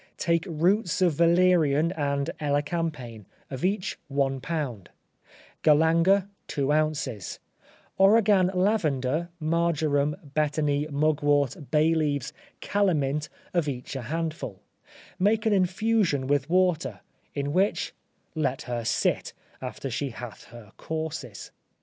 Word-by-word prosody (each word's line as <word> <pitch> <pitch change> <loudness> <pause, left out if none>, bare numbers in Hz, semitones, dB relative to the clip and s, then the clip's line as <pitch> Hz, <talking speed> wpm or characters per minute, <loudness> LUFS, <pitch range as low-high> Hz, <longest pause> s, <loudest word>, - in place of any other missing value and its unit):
Take 170 -1 +1
roots 175 +4 +1
of 175 -3 +3
valerian 170 -2 +3
and 140 -4 -1
elecampane, 145 - -2 0.2
of 130 -1 -5
each 190 +1 -1
one 135 -1 0
pound; 140 - -4 0.7
galanga, 165 +6 +4 0.2
two 140 0 -1
ounces; 150 -9 -1 0.6
origan 195 -2 +5
lavender, 170 -6 +1
marjoram, 155 -3 +1 0.2
betony, 150 -1 +1
mugwort, 145 -2 +1
bay 155 +1 +3
leaves, 145 -4 -1 0.3
calamint, 150 -7 0 0.2
of 170 -4 +1
each 130 0 -5
a 135 - -3
handful; 155 - -4 0.6
make 215 +4 +2
an 220 - +3
infusion 190 -5 +1
with 140 +1 0
water, 165 - +1 0.3
in 140 0 -2
which 195 +4 +1 0.4
let 145 -3 -1
her 120 -1 -3
sit, - - 0 0.3
after 130 +1 -5
she 140 +4 -2
hath 120 -1 -9
her 120 -3 -13
courses. 160 -1 -5
155 Hz, 110 wpm, -26 LUFS, 140-170 Hz, 0.7 s, origan